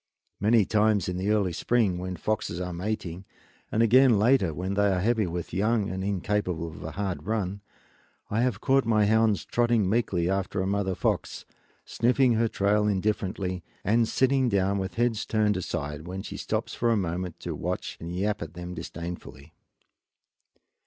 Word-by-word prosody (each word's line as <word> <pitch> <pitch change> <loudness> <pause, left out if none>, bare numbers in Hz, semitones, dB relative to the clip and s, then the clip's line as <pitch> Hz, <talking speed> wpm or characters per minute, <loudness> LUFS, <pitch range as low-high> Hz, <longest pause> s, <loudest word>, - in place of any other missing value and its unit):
Many 110 0 +4
times, 105 -2 +2
in 90 0 -2
the 95 +3 -1
early 100 -4 +2
spring, 105 -2 +1
when 90 0 -4
foxes 105 -3 -2
are 90 -1 -4
mating, 90 -1 -4 0.5
and 110 - +3
again 125 0 +6
later 110 -4 +3
when 90 +5 -3
they 100 +1 +3
are 90 - +1
heavy 110 0 +1
with 85 0 -5
young 105 +2 +1
and 95 0 -3
incapable 95 -4 -1
of 80 - -10
a - - -6
hard 95 -2 -3
run, 100 -3 -2 0.7
I 110 +3 0
have 120 -4 0
caught 135 0 +3
my 110 -2 +3
hounds 110 -1 +2
trotting 120 -4 +2
meekly 95 -5 +1
after 95 0 -1
a 95 - 0
mother 100 -1 0
fox, - - -2 0.4
sniffing 125 +1 +2
her 115 +1 +2
trail 105 0 +1
indifferently 95 -2 -1 0.2
and 115 +3 +3
sitting 130 0 +2
down 100 -1 +1
with 95 +1 -4
heads 115 -2 +1
turned 105 -1 +1
aside 80 -3 -4
when 95 +1 -5
she - - -7
stops - - -3
for 120 - 0
a 115 - +3
moment 90 -2 -3
to - - -4
watch - - -4
and 85 +2 -6
yap 105 +3 -1
at 85 0 -7
them 90 0 -6
disdainfully. 85 -3 -8
100 Hz, 175 wpm, -27 LUFS, 90-110 Hz, 0.7 s, again